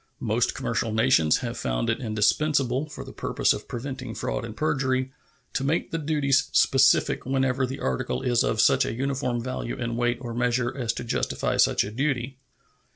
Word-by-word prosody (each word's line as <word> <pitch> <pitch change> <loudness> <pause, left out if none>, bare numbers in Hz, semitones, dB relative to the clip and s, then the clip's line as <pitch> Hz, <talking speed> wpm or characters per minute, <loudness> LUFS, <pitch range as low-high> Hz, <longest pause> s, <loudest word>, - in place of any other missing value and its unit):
Most - - 0
commercial 115 - -1
nations 110 -9 +3
have - - -4
found - - -1
it - - 0
indispensable, 130 +5 +1
for 140 - -8
the - - -11
purpose - - +1
of - - -7
preventing 130 +1 -6
fraud 130 - -3
and 115 -1 -8
perjury, 130 -3 0 0.4
to 135 - -1
make 150 +5 0
the 165 - -1
duties 140 -3 +1
specific 135 0 +4
whenever 130 0 0
the 135 +2 -6
article 65 -1 -2
is 120 -1 +2
of 110 - 0
such 135 +3 +5
a 115 - -3
uniform 130 -2 -1
value 130 -1 -4
in 120 -2 -3
weight 120 0 +1
or 120 -3 -6
measure 120 +1 0
as 120 -4 -1
to - - -5
justify 115 - -1
such - - +4
a 100 - -6
duty. 130 +1 -2
130 Hz, 180 wpm, -25 LUFS, 115-135 Hz, 0.4 s, such